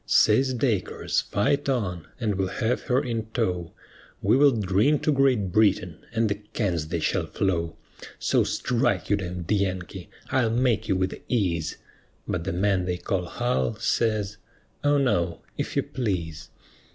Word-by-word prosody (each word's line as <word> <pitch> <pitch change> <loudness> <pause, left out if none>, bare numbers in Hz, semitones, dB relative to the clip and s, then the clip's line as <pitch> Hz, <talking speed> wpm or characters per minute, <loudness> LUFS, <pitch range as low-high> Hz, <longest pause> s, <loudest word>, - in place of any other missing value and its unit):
Says 130 +4 +4
Dacres, 115 -7 0
"Fight 140 +8 0
on, 95 -10 -1
and 110 -4 0
we'll 95 -1 0
have 110 +5 -1
her 130 +2 +3
in 115 -3 -3
tow, 90 -8 -1 0.5
We - - +4
will 145 +2 +6
drink 110 +5 +2
to 155 - +3
Great 130 -9 +2
Britain, 95 -5 +2
and 115 -1 +1
the 100 - +1 0.2
cans 85 -8 -1
they 85 +1 -2
shall - - 0
flow; 85 -4 -1 0.4
So - - +2
strike, 120 -6 0
you - - +6
d 95 -3 -4
d 90 +2 -3
Yankee, 95 -4 -3 0.2
I'll 125 -4 +2
make 115 -2 +1
you 100 - +2
with 95 0 -2
ease:" 85 -9 0 0.5
But 85 -1 -2
the 95 - -1
man 95 0 +1
they 90 -1 -1
call 90 0 -2
Hull, 120 +3 -1
says, 110 -2 0 0.5
"O 145 0 +4
no, 90 -11 +1
if - - -4
you - - +2
please." 90 -10 -3
105 Hz, 160 wpm, -26 LUFS, 90-120 Hz, 0.5 s, will